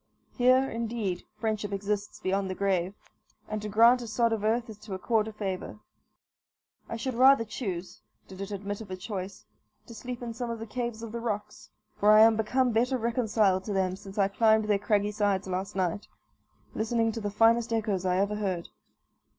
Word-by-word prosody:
Here, 255 +1 +4
indeed, 225 -6 -3
friendship 215 -2 -2
extends 205 +1 -3
beyond 190 0 0
the 185 - -3
grave, 190 -1 0 0.5
and 215 0 -4
to 210 - -5
grant 230 +4 +5
a 235 - -6
sod 230 +1 +1
of 215 -2 -2
earth 230 +2 +1
is 215 -2 -10
to 210 -2 -6
accord 215 +3 +1
a - - -5
favour. 200 -2 -5 1.1
I - - -3
should 255 +3 -3
rather 260 0 +6
choose, 190 -6 -5 0.3
did 190 0 -10
it 195 - -5
admit 205 +1 -5
of 210 - -10
a 185 - -4
choice, 190 - -6 0.4
to 235 - -11
sleep 245 +2 -7
in 235 -1 -4
some 240 +1 -4
of 230 - -3
the 225 - -6
caves 235 0 -4
of 230 - -6
the 235 - -4
rocks, 210 -3 -5 0.3
for 205 - +4
I 215 - +8
am 225 0 +7
become 245 +4 +1
better 245 +4 +1
reconciled 220 -5 +1
to 210 - -3
them 185 -1 0
since 195 +1 -12
I 195 -1 +4
climbed 220 +1 +3
their 205 -1 +2
craggy 205 0 +1
sides 200 -2 0
last 190 +2 -3
night, 185 +1 -1 0.7
listening 225 +1 0
to 225 - -5
the 205 - -2
finest 230 +3 +3
echoes 215 -5 0
I 180 -1 +1
ever 200 +2 0
heard. 185 -5 -3
215 Hz, 195 wpm, -28 LUFS, 195-230 Hz, 1.1 s, I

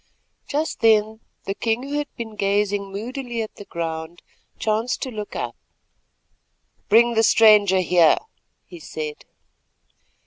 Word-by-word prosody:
Just 305 +3 -2
then 220 -1 +3 0.2
the 195 - -3
king, 225 +4 -1
who 285 +2 -2
had 295 - -3
been 220 -2 -7
gazing 200 0 0
moodily 240 +3 -4
at 215 - -10
the 205 - -10
ground, 165 0 -5 0.3
chanced 220 +3 -1
to 260 - -5
look 210 -2 -7
up. - - -4 1.3
"Bring 235 +3 +5
the 225 - +3
stranger 210 -4 +5
here," 175 -3 +4 0.5
he 175 - -12
said. 155 -1 -7
215 Hz, 130 wpm, -22 LUFS, 195-230 Hz, 1.3 s, Bring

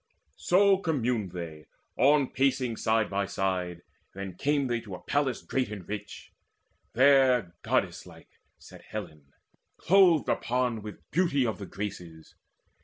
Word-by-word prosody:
So 195 +1 +4
communed 125 - -1
they, 80 -4 -8 0.3
on 140 0 +3
pacing 130 -3 +1
side 110 -1 +1
by 100 0 -2
side. 90 -3 -2 0.3
Then 95 -1 -6
came 145 +8 0
they 120 -2 -1
to 100 -5 -8
a 90 - -13
palace 140 -3 -1
great 130 -4 -1
and 100 -4 -8
rich: 105 -1 -7 0.6
There 130 -7 +4
goddess - - -1
like - - -17 0.2
sat - - -14
Helen, 75 -3 -9 0.5
clothed 180 -5 +4
upon 125 -2 0
With 105 0 -10
beauty 165 -7 +2
of 110 -2 -2
the 100 - -7
Graces. 90 -6 -7
115 Hz, 135 wpm, -28 LUFS, 95-135 Hz, 0.6 s, So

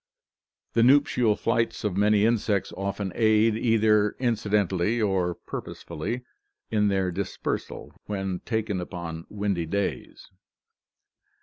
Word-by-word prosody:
The 115 - +3
nuptial 130 -3 +4
flights 115 +1 0
of 105 -4 -1
many 105 +1 +4
insects 105 -4 +1
often 100 0 -3
aid, 110 0 +3
either 110 -2 +3
incidentally 105 -3 +1
or 95 -5 +1
purposefully, 120 +11 -6 0.5
in 105 -2 +2
their 95 -2 +1
dis 95 +2 -4
persal, - - -4 0.2
when 95 -3 -3
taken 110 -5 -2
upon 85 -2 -6
windy 100 -5 -2
days. 100 +4 -3
105 Hz, 110 wpm, -26 LUFS, 95-115 Hz, 0.5 s, nuptial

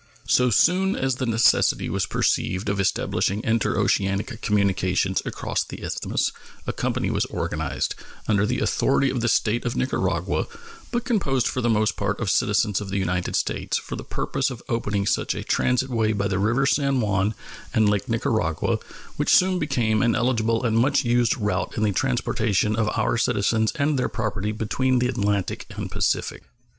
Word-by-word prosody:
So 125 0 +4
soon 185 - +3
as 130 -1 -1
the 130 - -2
necessity 115 0 +3
was - - -1
perceived 95 +3 0
of 100 0 -1
establishing 100 +1 0
interoceanic 110 0 0
communications 95 -2 +1
across - - -2
the - - -10
Isthmus - - -1 0.3
a - - -2
company - - -1
was - - 0
organized, - - -2 0.3
under 105 -1 +2
the - - -1
authority 135 -2 +2
of 125 -2 -2
the 120 - 0
State 115 0 +1
of 120 - -2
Nicaragua, 95 - -1 0.4
but 240 0 -1
composed 135 - +1
for 130 - -2
the 120 - +1
most 110 -1 +1
part 100 0 -1
of 110 -5 0
citizens 105 -1 +1
of 100 - -6
the 100 - -2
United 90 -2 -1
States, - - -1
for - - -6
the - - -7
purpose 135 +1 -2
of 125 -3 -8
opening 105 -4 -1
such 100 - 0
a - - -4
transit 130 +1 +1
way 110 -2 +1
by 100 -1 0
the 100 -2 -1
river 115 +7 +2
San 140 -1 +2
Juan 105 -1 0 0.4
and 110 -1 +3
Lake 105 +4 0
Nicaragua, 110 - 0 0.4
which - - 0
soon 185 0 +4
became 110 -7 +1
an 120 -1 +2
eligible 115 -1 +1
and 115 -2 +2
much 140 +3 +2
used 120 -2 +2
route 105 -2 -2
in 110 - 0
the 105 - +2
transportation 110 -2 0
of 110 -1 +1
our 110 +1 +1
citizens 110 +1 +1
and 145 -2 +1
their - - 0
property 105 -2 -2
between 125 +4 0
the 125 0 +2
Atlantic 100 -5 -1
and - - -5
Pacific. - - -1
110 Hz, 175 wpm, -24 LUFS, 105-125 Hz, 0.4 s, So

